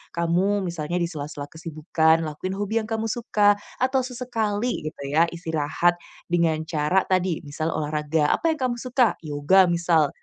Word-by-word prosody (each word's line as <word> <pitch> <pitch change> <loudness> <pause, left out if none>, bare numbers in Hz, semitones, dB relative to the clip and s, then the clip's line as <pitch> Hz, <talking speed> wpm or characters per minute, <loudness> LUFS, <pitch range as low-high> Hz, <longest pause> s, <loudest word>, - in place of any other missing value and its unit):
kamu 180 +4 +1
misalnya 170 0 -3
di 170 - 0
sela-sela 145 -3 -6
kesibukan 160 0 +1
lakuin 185 +6 -4
hobi 205 +3 -1
yang 215 - -5
kamu 225 0 -2
suka 210 -3 +3 0.2
atau 260 +1 +2
sesekali 245 -3 -2
gitu 140 - -7
ya 160 +2 +5
istirahat 165 0 0 0.4
dengan 170 -2 +2
cara 160 +4 +1
tadi 185 -3 +1
misal 155 +3 -3
olahraga. 150 0 0
Apa 330 -1 +1
yang 310 - -9
kamu 240 - -2
suka? 250 -1 +2
Yoga 155 +5 +4
misal, 170 -3 +2
170 Hz, 155 wpm, -24 LUFS, 155-205 Hz, 0.4 s, ya